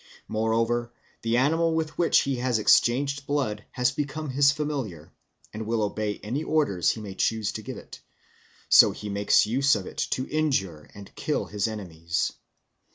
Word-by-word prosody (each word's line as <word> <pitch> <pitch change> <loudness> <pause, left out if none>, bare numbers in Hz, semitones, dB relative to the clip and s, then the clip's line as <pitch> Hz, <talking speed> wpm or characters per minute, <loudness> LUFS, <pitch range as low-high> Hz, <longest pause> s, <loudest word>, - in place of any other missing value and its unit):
Moreover, 115 +2 0 0.3
the 115 +1 +1
animal 160 +5 +2
with 160 -1 -2
which 170 - +3
he 135 -2 -2
has 125 -1 0
exchanged 140 +6 +2
blood 130 -8 -1
has 125 0 +1
become 145 +2 -4
his 140 +1 +4
familiar, 135 - -4 0.4
and 110 0 -6
will 115 -1 0
obey 105 0 -2
any 125 +9 -2
orders 145 - +1
he - - -1
may 100 -2 -7
choose 110 +1 0
to - - -6
give - - -7
it; - - -12 0.7
so - - +7
he 105 - -7
makes 100 +1 +3
use 135 +5 +3
of - - -4
it - - -9
to 130 - -2
injure 115 - -1
and 100 -1 -12
kill - - -2
his 105 +1 -2
enemies. 85 -6 -3
120 Hz, 165 wpm, -26 LUFS, 105-140 Hz, 0.7 s, so